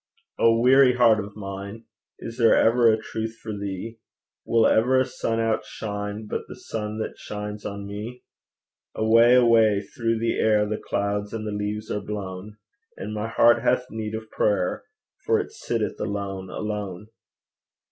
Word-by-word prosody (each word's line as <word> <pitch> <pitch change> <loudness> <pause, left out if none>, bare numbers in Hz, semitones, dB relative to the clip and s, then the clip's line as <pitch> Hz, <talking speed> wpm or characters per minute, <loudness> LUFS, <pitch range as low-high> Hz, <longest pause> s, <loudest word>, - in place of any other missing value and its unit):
O 115 0 +4
weary 130 +1 +6
heart 115 -4 +4
of 100 0 -11
mine, 100 +2 -7 0.3
Is 115 +2 -8
there 115 -1 +6
ever 115 0 +5
a 110 - +2
truth 110 +1 -5
for 110 -2 -6
thee? 100 +3 -6 0.5
Will 115 -1 +4
ever 125 +4 +4
a 130 - +2
sun 115 -2 -2
outshine 105 -1 -3
But - - -3
the - - -9
sun 105 -1 -5
that 110 - -5
shines 105 0 -6
on 100 0 -6
me? 105 +5 -7 0.7
Away, 115 +3 +5
away 115 -4 +5
through 115 -1 -2
the 115 +1 -1
air 105 -1 +3
The 105 +1 -3
clouds 100 +1 -2
and 110 -1 -4
the 105 - -3
leaves 105 +1 -3
are 105 - -2
blown; 100 0 -6 0.4
And 105 - -5
my 105 +1 -3
heart 120 +1 +4
hath 125 0 +1
need 110 -1 -4
of 110 0 -8
prayer, 95 -4 0 0.4
For - - +2
it - - -4
sitteth - - -3
alone, 100 -2 -4
alone. 105 -1 -5
110 Hz, 160 wpm, -24 LUFS, 105-115 Hz, 0.7 s, weary